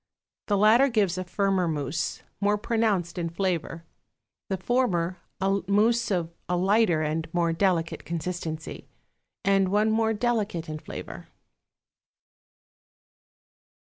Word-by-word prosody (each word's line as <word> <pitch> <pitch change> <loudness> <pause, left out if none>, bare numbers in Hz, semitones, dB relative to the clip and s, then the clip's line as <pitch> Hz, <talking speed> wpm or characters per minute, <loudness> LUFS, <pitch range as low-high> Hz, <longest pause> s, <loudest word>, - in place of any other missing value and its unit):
The 205 - +2
latter 225 +7 +5
gives 200 -6 +1
a - - -2
firmer 190 -1 0
mousse, 155 0 -2 0.2
more 205 +1 +2
pronounced 205 -6 0
in 170 -1 -1
flavor; 170 -2 -2 0.6
the 190 - -1
former, 185 -5 0 0.2
a 195 +1 +1
mousse 230 +4 +3
of 175 -4 -1 0.2
a 180 - +1
lighter 190 -3 +3
and 155 +1 -2
more 170 -1 +2
delicate 170 -2 0
consistency, 165 -2 -5 0.6
and 195 -1 +3
one 210 +2 +2
more 225 0 +2
delicate 210 -7 -1
in 155 0 -5
flavor. - - -8
190 Hz, 115 wpm, -26 LUFS, 170-210 Hz, 0.6 s, latter